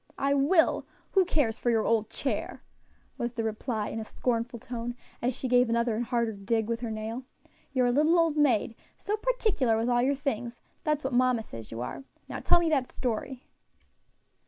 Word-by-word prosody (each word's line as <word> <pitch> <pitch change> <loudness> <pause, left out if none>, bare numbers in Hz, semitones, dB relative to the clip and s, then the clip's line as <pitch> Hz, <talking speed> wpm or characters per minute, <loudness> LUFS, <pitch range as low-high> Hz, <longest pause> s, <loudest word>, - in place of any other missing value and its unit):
"I 275 +1 +2
will; 305 +5 +3 0.2
who 385 -2 +4
cares 290 -10 +1
for 240 - 0
your 225 -2 +3
old 220 -2 +2
chair?" - - -3 0.6
was 235 0 -2
the 230 -2 -2
reply 220 0 -2
in 225 - -4
a - - -3
scornful 235 +1 -2
tone, 240 +1 -5 0.3
as 245 0 0
she 260 - -3
gave 245 -1 +4
another 235 -1 +1
and 240 +2 -1
harder 235 -2 0
dig 210 +2 -1
with 230 0 -1
her 235 -1 -4
nail. 220 +3 -4 0.5
"You're 255 -2 +2
a 245 - +3
little 305 +6 +4
old 330 -2 +3
maid 250 -7 +2 0.2
so 415 - -1
particular 430 - +1
with 230 +2 0
all 240 0 +3
your 275 +3 +2
things 240 -4 -3 0.2
that's 300 -1 0
what 265 0 -2
mamma 250 -2 +3
says 115 - -9
you 115 +1 -5
are. 200 - -5 0.2
Now - - -5
tell - - +5
me 340 - +1
that 270 -5 +1
story." 250 +1 -3
245 Hz, 195 wpm, -28 LUFS, 225-275 Hz, 0.6 s, tell